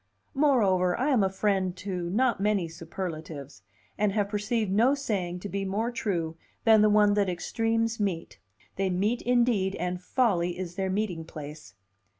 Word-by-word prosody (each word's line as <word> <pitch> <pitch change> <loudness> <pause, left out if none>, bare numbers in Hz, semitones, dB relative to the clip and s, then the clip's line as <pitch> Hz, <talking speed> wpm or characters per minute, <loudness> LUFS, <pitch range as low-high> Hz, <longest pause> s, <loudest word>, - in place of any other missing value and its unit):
Moreover, 205 -11 +3
I 265 +4 +1
am 240 -7 +4
a 190 - +2
friend 190 -2 0
to 180 -3 -4
not 235 +1 +1
many 200 -4 +1
superlatives, 160 - -7 0.4
and 210 -1 +2
have 205 -1 0
perceived 210 0 -1
no 235 +8 +4
saying 185 -10 -3
to 205 - -5
be 200 0 -3
more 210 +5 -1
true 175 -9 -2 0.3
than 220 -2 +6
the 215 - +5
one 210 -1 +5
that 205 -2 +2
extremes 225 +5 -1
meet: 190 -5 -3 0.4
they 195 0 +1
meet 205 +7 0
indeed, 235 -6 +2
and 180 0 -3
folly 180 -5 +1
is 180 -2 -5
their 190 +1 -2
meeting 190 -4 -1
place. 150 -7 -10
195 Hz, 160 wpm, -28 LUFS, 180-220 Hz, 0.4 s, than